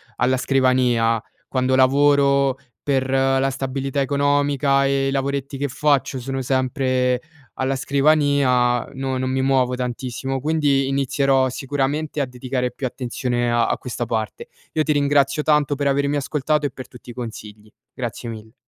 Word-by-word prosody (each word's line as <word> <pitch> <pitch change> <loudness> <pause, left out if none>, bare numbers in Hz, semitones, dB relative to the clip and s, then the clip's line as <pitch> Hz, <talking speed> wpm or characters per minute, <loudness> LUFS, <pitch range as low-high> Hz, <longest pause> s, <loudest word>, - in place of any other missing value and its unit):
alla 130 +1 +1
scrivania, 125 -4 +2 0.3
quando 130 0 +1
lavoro 140 0 +4 0.2
per 135 -2 0
la 135 0 +2
stabilità 135 +1 -2
economica 140 0 +2
e 135 0 +1
i - - -1
lavoretti 140 0 -2
che 145 - 0
faccio 140 0 0
sono 135 +2 -4
sempre 130 -1 0 0.4
alla 130 +1 0
scrivania, 140 -3 +2
no 135 -1 -3
non 130 0 -1
mi 130 0 0
muovo 130 -2 +2
tantissimo; 125 +1 -3
quindi 145 -3 +1
inizierò 135 -1 +1
sicuramente 145 +3 -2
a 140 - +1
dedicare 125 0 -3
più 130 +2 -4
attenzione 120 -1 -2
a 120 -1 +2
a - - 0
questa 120 -1 -4
parte, 115 - -3 0.2
io 155 - 0
ti 155 - +1
ringrazio 145 0 +2
tanto 150 -2 +2
per 145 +1 -3
avermi 140 +1 +1
ascoltato 150 +1 0
e 140 - -1
per 130 - -9
tutti 125 0 -12
i - - -10
consigli, 110 -3 -9 0.2
grazie 120 -1 -5
mille. 110 -1 -8
135 Hz, 150 wpm, -21 LUFS, 125-140 Hz, 0.4 s, lavoro